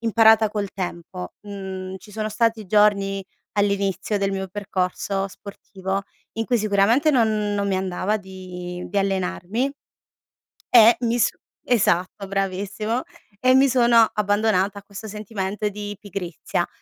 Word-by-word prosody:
imparata 225 -1 +5
col 205 -2 -3
tempo. 170 - -5
Mhmm, 190 -2 -6
ci 210 - -15
sono 215 +1 -3
stati 225 -1 0
giorni 200 -1 +3 0.4
all'inizio 200 0 +1
del 195 0 0
mio 190 0 -3
percorso 195 0 -2
sportivo 195 0 -5 0.4
in 225 - +1
cui 245 - +2
sicuramente 215 +8 +3
non 215 -5 +2
non 200 0 0
mi 190 - +1
andava 190 +3 -1
di 180 -2 -8
di 200 +2 0
allenarmi 195 +6 -1 1.0
e 235 -1 +8
mi 235 0 +1
s - - +4 0.4
esatto 195 -4 +1
bravissimo, 200 +4 -2 0.4
e 255 0 +4
mi 270 0 +5
sono 235 -2 +5
abbandonata 205 -1 +1
a - - -17
questo 200 +2 -9
sentimento 210 0 -3
di 205 0 -6
pigrizia, 185 -5 -3
200 Hz, 130 wpm, -23 LUFS, 190-220 Hz, 1.0 s, e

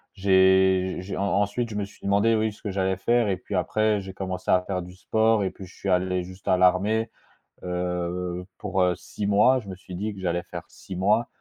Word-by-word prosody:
j'ai 95 -1 +4
j'ai 95 +2 -6
en - - -1
ensuite, 100 +4 0
je 105 - -7
me 105 -1 -1
suis 100 - -18
demandé, 100 +3 +3
oui, 110 0 +1
ce 105 - -18
que 105 - -3
j'allais 95 -1 0
faire 120 +3 +2
et 95 - 0
puis 105 - -9
après 105 +3 +1
j'ai 95 0 -8
commencé 95 -1 -5
à 90 - +5
faire 90 -1 -3
du 90 +1 -11
sport, 110 +2 +2
et 95 - -1
puis 95 - -11
je 90 - -17
suis 100 - -4
allé 90 0 +1
juste 95 +2 -12
à 90 - +4
l'armée, 100 +5 +2 0.5
heu, 90 0 -3
pour, 95 -2 0
heu, 90 -1 +3
6 105 - -6
mois, 105 +6 +4
je 105 - -15
me 95 - -6
suis 90 0 -10
dit 105 +4 -3
que 95 - -10
j'allais 85 -1 -1
faire - - -7
6 95 - -10
mois, 105 +6 +2
95 Hz, 230 wpm, -25 LUFS, 90-105 Hz, 0.5 s, à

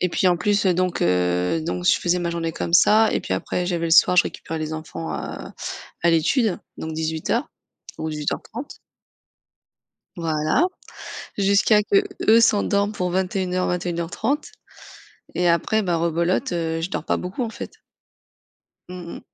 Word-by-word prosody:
Et 180 - +2
puis 185 - 0
en 175 - +3
plus, 205 +3 +1
heu, 180 - +4
donc 180 0 0
heu, 90 - +1
donc 175 +1 -3
je - - +6
faisais 180 0 +1
ma 170 -1 -2
journée 165 -1 -2
comme 170 - -4
ça 215 +5 +5
et - - 0
puis - - -4
après 175 - -2
j'avais 170 -2 -1
le 165 - -3
soir, 180 +2 +6
je - - +6
récupérais 160 - -5
les 155 0 -4
enfants 85 - -6
à 70 - -6 0.5
à 170 - +4
l'étude, 185 - +2 0.2
donc 160 - -5
18:00 160 - -1 0.5
ou 160 - -3
18:30. 155 - -5 1.4
Voilà. 160 - +1 0.7
Jusqu'à 200 +2 +4
qu'eux 385 - +3
s'endorment 205 -2 +2
pour 180 -4 -2
21:00-21:30 180 - -1 0.9
et 175 0 +2
après 170 +6 +2
bah 175 -4 0
rebelote, 170 - 0
heu, 165 -1 -1
je 165 +3 -3
dors 150 - -3
pas - - +1
beaucoup, 180 +7 -4
en 230 - -2
fait. - - -7 1.2
Mmh 180 -2 -7
mh. - - -10
175 Hz, 155 wpm, -23 LUFS, 165-200 Hz, 1.4 s, je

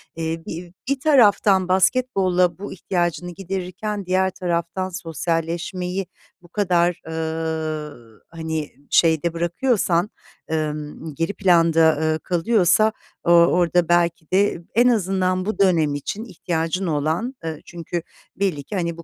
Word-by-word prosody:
eee, 165 0 -3
bi 170 +1 -7 0.2
bir 275 -1 0
taraftan 210 - +4
basketbolla 185 -3 +2
bu 205 - -6
ihtiyacını 175 -1 -2
giderirken 195 +3 -4
diğer 185 +1 +2
taraftan 175 +1 -2
sosyalleşmeyi 175 +2 -3 0.3
bu 175 - -17
kadar, 175 -3 +1
ııı, 160 -7 -4
hani, 160 -2 -4 0.2
şeyde 165 0 +3
bırakıyorsan, 175 +1 +1 0.4
ımm, 150 -1 -4
geri 165 +6 -1
planda, 165 -4 +4
ııı, 155 0 +1
kalıyorsa 185 +4 +3 0.3
o 170 - +2
orada 175 0 +4
belki 170 -2 +1
de 195 -2 +2
en 240 +2 +5
azından 185 -4 +1
bu 215 - -3
dönem 165 -7 +3
için 195 +9 -4
ihtiyacın 175 -2 -2
olan, 160 - -1
ııı, 160 -2 -4
çünkü 170 0 -5 0.3
belli 185 -8 -1
ki, 205 - -7
hani, 170 -3 -2
bu 170 - -9
175 Hz, 125 wpm, -22 LUFS, 160-190 Hz, 0.4 s, en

